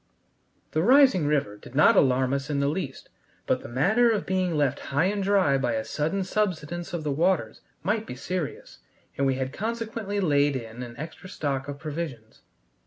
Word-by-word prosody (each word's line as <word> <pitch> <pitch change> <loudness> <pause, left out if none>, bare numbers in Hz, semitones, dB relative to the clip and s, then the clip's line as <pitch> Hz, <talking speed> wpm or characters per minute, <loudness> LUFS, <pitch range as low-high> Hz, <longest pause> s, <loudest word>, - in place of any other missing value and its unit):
The 155 - +1
rising 250 - +5
river 140 -9 0
did 120 - -14
not 155 - +6
alarm 130 0 +3
us 140 +1 -2
in 145 -2 0
the 140 - +2
least, 145 -4 -5 0.4
but - - +1
the - - -9
matter 195 - +3
of 220 -3 0
being 185 -3 0
left 145 -3 +1
high 140 +5 +2
and 200 +1 0
dry 190 -9 +3
by 120 -3 0
a 110 -1 -2
sudden 160 +6 -1
subsidence 175 -4 -2
of 170 -2 -3
the 150 - -1
waters 155 - 0 0.2
might 210 +5 0
be 125 - -6
serious, 170 +3 -5 0.4
and 140 - +1
we 135 - +2
had 130 +1 -3
consequently 220 -1 -3
laid 145 -5 +3
in 115 -1 -6
an 120 -1 -8
extra 165 +6 -8
stock 140 -4 -2
of 145 0 -5
provisions. 145 -7 -6
150 Hz, 185 wpm, -26 LUFS, 135-190 Hz, 0.4 s, not